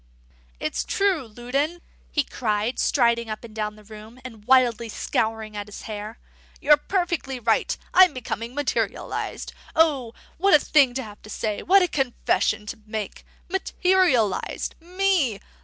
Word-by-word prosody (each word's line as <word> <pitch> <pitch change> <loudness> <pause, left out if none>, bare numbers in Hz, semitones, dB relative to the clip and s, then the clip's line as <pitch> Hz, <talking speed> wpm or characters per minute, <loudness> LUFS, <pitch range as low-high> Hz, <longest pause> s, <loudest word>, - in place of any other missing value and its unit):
"It's 155 - -2
true, 390 - 0
Loudon," 270 +9 -2 0.3
he 295 - +2
cried, 220 -1 -2
striding 235 -3 +2
up 215 +1 -5
and 230 -2 -11
down 210 -1 -3
the 215 - -16
room, 215 +3 -12
and 225 -4 -10
wildly 240 -3 +3
scouring 220 0 -2
at 205 0 -5
his 205 - -10
hair. 215 +1 -6 0.4
"You're 295 +1 +6
perfectly 335 -5 -2
right. 225 -1 +1 0.2
I'm 370 -2 +8
becoming 235 -2 -5
materialised. 235 -7 -2 0.2
O, 280 -8 +2 0.2
what 390 0 +6
a - - +7
thing 275 -5 +3
to 265 - -2
have 210 -2 -12
to 215 - -13
say, 215 -1 -3
what 390 +1 +5
a - - +2
confession 255 -6 0
to 215 - -7
make! 215 -2 -5 0.2
Materialised! 360 - +1
Me! 355 - +1
245 Hz, 145 wpm, -24 LUFS, 215-305 Hz, 0.4 s, I'm